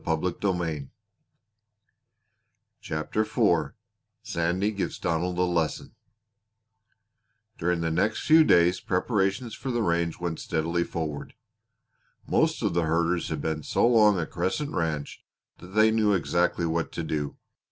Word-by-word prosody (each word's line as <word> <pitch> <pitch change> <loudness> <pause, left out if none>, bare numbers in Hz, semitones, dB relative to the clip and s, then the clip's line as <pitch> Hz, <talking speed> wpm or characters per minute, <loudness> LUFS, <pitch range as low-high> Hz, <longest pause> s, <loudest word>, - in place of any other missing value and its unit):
CHAPTER 80 +7 -2
IV 110 - +1 0.5
SANDY 90 +5 0
GIVES 100 -2 -3
DONALD 90 +1 -1
A 90 - +2
LESSON 85 -3 -1 1.7
During 85 0 0
the 80 -1 -1
next 105 +7 0
few 160 +1 +7
days 90 - +4
preparations 100 +4 -1
for 135 - -6
the 120 -2 0
range 85 -2 0
went 85 -2 -3
steadily 85 +2 -1
forward. 75 -4 -5 0.9
Most - - +1
of - - +1
the 85 -1 +1
herders 85 +2 0
had 80 -2 -3
been 80 0 -2
so - - +1
long 105 -5 +5
at 80 - -4
Crescent 95 - -2
Ranch 80 - -3 0.4
that 90 +2 -12
they 110 +1 +5
knew 110 -2 +2
exactly 85 -1 +1
what 80 0 -1
to 85 - -3
do. 75 -3 -3
85 Hz, 125 wpm, -26 LUFS, 80-100 Hz, 1.7 s, few